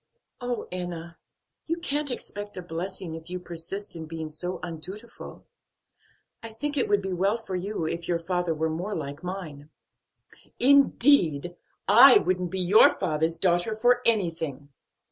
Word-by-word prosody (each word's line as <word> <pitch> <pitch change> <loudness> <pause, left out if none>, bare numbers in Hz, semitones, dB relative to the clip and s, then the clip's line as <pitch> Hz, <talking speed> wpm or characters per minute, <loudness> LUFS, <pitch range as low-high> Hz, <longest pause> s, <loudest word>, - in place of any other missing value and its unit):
"Oh, 245 -1 -3
Enna! 170 -2 -6 0.5
you 330 +1 -1
can't 295 -3 -2
expect 205 -5 -6
a 185 - -5
blessing, 175 +1 -5
if 160 +1 -9
you 180 - -3
persist 175 +3 -6
in 160 -1 -7
being 160 -1 -6
so 180 +4 -4
undutiful; 180 +7 -8 1.0
I 230 - -7
think 290 +7 -4
it 270 - +1
would 205 -1 +2
be 190 -1 -3
well 195 +5 +1
for 220 -5 -6
you 185 -1 -3
if 170 +1 -4
your 175 - +1
father 175 -1 -1
were 160 +1 -1
more 180 +6 -3
like 145 -2 -5
mine." 160 -6 -7 0.9
"Indeed! 245 - +4 0.3
I - - +9
wouldn't 180 - 0
be 190 +1 -3
your 185 +4 +7
father's 160 -2 -1
daughter 175 +5 +1
for 245 +2 +3
anything." 165 - 0
180 Hz, 150 wpm, -26 LUFS, 165-210 Hz, 1.0 s, I